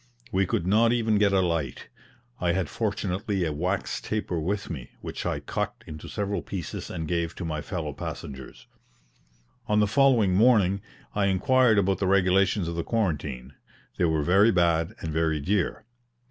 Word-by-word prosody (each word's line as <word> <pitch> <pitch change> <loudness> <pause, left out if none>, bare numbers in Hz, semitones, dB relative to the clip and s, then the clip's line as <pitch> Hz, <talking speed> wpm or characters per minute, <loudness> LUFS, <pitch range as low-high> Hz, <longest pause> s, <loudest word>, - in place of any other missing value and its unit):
We 95 0 +1
could 85 - -1
not 110 +5 +4
even 110 -3 +2
get 105 -1 +4
a 95 -1 +3
light. 80 -7 -2 0.5
I 85 -1 +1
had 95 -4 -1
fortunately 100 -2 -1
a 80 - -2
wax 90 +6 -2
taper 105 -5 -2
with 95 +6 -2
me, 70 -7 -6
which - - -5
I - - -1
cut - - -3
into 75 -1 -9
several 100 -1 -2
pieces 90 -5 -6
and 80 -1 -4
gave 85 -1 -1
to 90 - -5
my 75 -2 -3
fellow 80 -3 -4
passengers. 65 -2 -8 1.0
On 105 0 +2
the 105 - +4
following 115 -3 +3
morning 100 -2 +4 0.3
I 100 -1 +1
inquired 115 +4 +3
about 95 -1 +2
the 95 - 0
regulations 95 0 +3
of 85 - -3
the 85 0 -2
quarantine 75 - -2 0.5
they 90 - +4
were 80 -2 +1
very 95 +7 +5
bad 85 +1 +1
and 80 -1 -4
very 80 -1 +1
dear. 95 +6 -1
95 Hz, 170 wpm, -26 LUFS, 80-105 Hz, 1.0 s, very